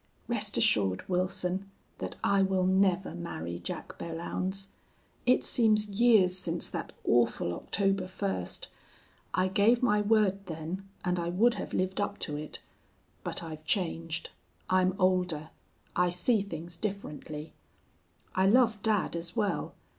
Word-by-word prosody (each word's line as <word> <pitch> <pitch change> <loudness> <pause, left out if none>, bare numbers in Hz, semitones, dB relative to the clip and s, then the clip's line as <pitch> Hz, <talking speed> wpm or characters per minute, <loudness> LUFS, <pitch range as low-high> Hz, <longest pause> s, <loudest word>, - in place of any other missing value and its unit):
"Rest - - +1
assured, 95 -3 +3
Wilson, 185 +1 -1 0.3
that - - -4
I 200 -1 +3
will 190 -1 +2
never 190 0 +2
marry 85 0 -5
Jack - - -7
Belllounds. 185 +4 -3 0.6
It 250 - +4
seems 215 -3 +3
years 205 -4 +4
since 170 -1 0
that - - -5
awful 115 -7 +2
October 195 - 0
first. 95 - -3 0.6
I 185 - +3
gave 215 +6 +3
my 210 -4 +4
word 205 -2 +2
then, 170 +4 -5 0.2
and 180 0 +1
I 170 0 -1
would 220 +7 +3
have - - -6
lived 185 +2 0
up 205 0 -2
to 150 - -2
it. 150 +1 -6 0.7
But - - -3
I've 155 -1 -7
changed. 165 -2 -1 0.4
I'm 185 0 +3
older. 180 -5 +1 0.4
I 180 0 +3
see 190 +5 +2
things 170 -3 -6
differently. 155 -6 -5 0.8
I 190 +1 +3
love 220 -1 +4
dad 210 -5 +1
as 170 +1 -3
well. 200 -8 -1
185 Hz, 135 wpm, -30 LUFS, 165-200 Hz, 0.8 s, It